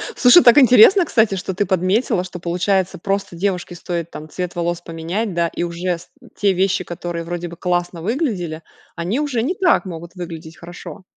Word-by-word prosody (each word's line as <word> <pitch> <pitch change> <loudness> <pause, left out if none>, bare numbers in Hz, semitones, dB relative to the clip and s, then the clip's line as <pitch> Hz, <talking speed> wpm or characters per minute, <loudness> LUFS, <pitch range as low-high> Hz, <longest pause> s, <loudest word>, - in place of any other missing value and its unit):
Слушай, 260 +7 +7
так 240 +1 +7
интересно, 260 - +7
кстати, 220 -8 +2
что 190 0 -4
ты 205 +3 0
подметила. 185 +2 +1
Что, 180 -1 -8
получается, 185 +2 0
просто 195 0 -3
девушке 180 -1 -2
стоит, 170 -1 -5
там, 155 +1 -9
цвет 180 +2 -5
волос 175 0 -2
поменять, 175 +6 -4
да. 170 0 +1
И - - -4
уже 175 +1 -2
с 170 - -16 0.3
те 200 -2 +2
вещи, 185 0 +1
которые 175 -1 -5
вроде 175 +1 -4
бы 170 - -11
классно 175 -1 -2
выглядели, 190 - -2 0.3
они 180 +9 -2
уже 285 -6 -1
не 350 +9 -1
так 355 - +2
могут 170 0 -8
выглядеть 165 -2 -8
хорошо. 175 +3 -10
180 Hz, 185 wpm, -19 LUFS, 170-205 Hz, 0.3 s, Слушай